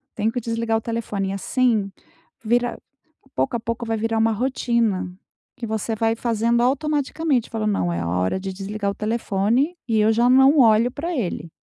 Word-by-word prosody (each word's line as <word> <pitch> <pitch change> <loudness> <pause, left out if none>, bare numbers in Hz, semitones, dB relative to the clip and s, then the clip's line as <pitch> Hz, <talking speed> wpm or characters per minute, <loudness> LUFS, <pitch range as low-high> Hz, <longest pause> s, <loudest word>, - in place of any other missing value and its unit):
tenho 220 +1 0
que 245 - -2
desligar 230 0 -1
o - - -4
telefone.". 210 -4 -3
Assim, 215 0 0 0.5
vira 240 +2 0 0.6
pouco 255 - 0
a - - -4
pouco, 230 +1 -4
vai 225 0 -1
virar 225 +1 -1
uma 225 0 +3
rotina, 235 -5 0 0.5
que 245 -3 -5
você 220 +1 -2
vai 225 +1 +1
fazendo, 235 0 +1
automaticamente. 285 0 0
Falando: 215 -2 -1
"Não, 90 - 0
é 85 - -2
a 85 - -3
hora 90 - 0
de 190 0 -5
desligar 200 +1 -3
o - - -5
telefone 225 - 0
e 225 -1 +2
eu 215 +1 +4
já 235 +2 +3
não 265 +3 +6
olho 230 0 +5
pra 335 +5 -4
ele.". 180 -7 -3
225 Hz, 180 wpm, -22 LUFS, 210-245 Hz, 0.6 s, não